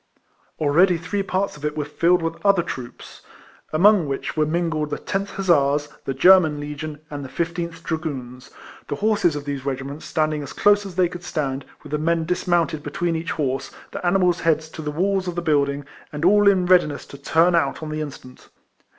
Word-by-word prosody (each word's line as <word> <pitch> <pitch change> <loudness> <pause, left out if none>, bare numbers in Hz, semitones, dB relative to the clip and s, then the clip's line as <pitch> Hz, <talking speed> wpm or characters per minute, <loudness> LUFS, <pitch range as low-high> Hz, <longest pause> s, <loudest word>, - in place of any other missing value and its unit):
Already 170 +5 +3
three 185 +4 -3
parts 195 0 -1
of 150 - -14
it 150 0 -2
were 150 - -1
filled 170 +4 +2
with 165 0 -4
other 200 -4 +4
troops, 130 -7 -8 0.5
among 185 +1 +4
which 135 +2 -4
were 155 -1 +2
iningled 160 -2 -1
the 145 - -3
10th 195 +1 -3
Hussars, 145 -6 +2 0.2
the 135 - -2
German 160 -1 +5
Legion, 150 +1 -6
and 145 -1 -5
the 135 - -8
15th 170 +2 -4
Dragoons; 130 -6 -5 0.4
the - - -2
horses 205 -4 +1
of 145 -1 -5
these 140 -2 -4
regiments 140 +2 -5
standing 155 -1 0
as 140 - -7
close 205 0 +3
as 185 - -10
they 180 -1 +3
could 175 +1 -9
stand, 140 -5 -3 0.2
with - - -11
the 150 - 0
men 165 +1 +1
dis 180 +2 -2
mounted 170 -3 +1
between 165 +4 -2
each 165 +1 -3
horse, 135 -4 -2 0.2
the - - -6
animals' 180 -1 +2
heads 160 -2 +1
to 160 - -8
the 150 -1 -3
w^alls 190 +4 0
of 175 - -3
the - - -1
building, 140 -3 +1 0.3
and 150 +2 -3
all 205 +2 +5
in 190 -2 +4
readiness 175 -6 +3
to 140 - -12
turn 170 +2 +3
out 160 -2 +1
on 155 - -5
the 155 0 -3
instant. 130 -4 -9
160 Hz, 200 wpm, -22 LUFS, 145-180 Hz, 0.5 s, German